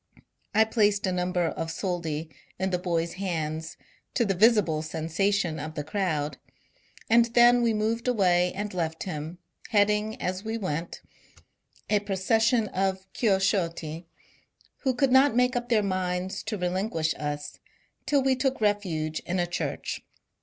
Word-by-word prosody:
I 220 - +7
placed 210 -2 +2
a 185 - 0
number 180 -1 0
of 165 0 -3
soldi 165 -3 -3 0.3
in 190 0 -1
the 180 - 0
boy's 170 -2 -1
hands, 160 -2 -3 0.4
to 235 - +3
the 195 - +1
visible 195 -6 +4
sensation 165 +2 -1
of 155 +2 -6
the 150 - -3
crowd, 160 -3 -2 0.7
and 230 +1 +5
then 240 0 +7
we 235 -1 +3
moved 225 +2 -1
away 180 -6 +3
and 205 +1 -4
left 165 -2 -2
him, 160 -1 -5 0.3
heading, 210 0 +2
as 185 +2 -3
we 220 +1 -3
went, 170 -5 -4 0.9
a 210 - +3
procession 220 +4 +1
of 190 0 -1
Chioszotti, 175 -6 0 0.7
who 260 -3 0
could 265 +1 +2
not 265 -1 +5
make 250 +1 +3
up 240 0 -2
their 220 -3 +3
minds 185 -1 -2
to 220 -1 -3
relinquish 180 -3 -1
us 150 0 -4 0.5
till 285 -2 +3
we 265 0 +3
took 265 +1 0
refuge 180 -8 0
in 180 - -1
a 175 - +2
church. 175 - -3
190 Hz, 145 wpm, -27 LUFS, 165-220 Hz, 0.9 s, I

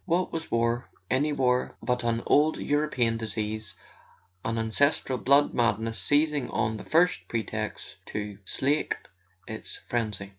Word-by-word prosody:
What 180 0 +1
was 165 -1 -4
war—any 120 +4 0
war—but 125 -1 0
an 115 0 0
old 155 +2 +4
European 140 -6 +1
disease, 110 -1 -3 0.7
an 115 0 -1
ancestral 125 +3 +1
blood 140 +4 +4
madness 115 -1 +1
seizing 145 -2 +2
on 110 0 0
the - - -8
first 175 +3 +2
pretext 115 -3 -4
to 105 -1 -5
slake 140 +9 0 0.5
its 110 0 -6
frenzy? 105 -5 -2
120 Hz, 120 wpm, -28 LUFS, 110-145 Hz, 0.7 s, old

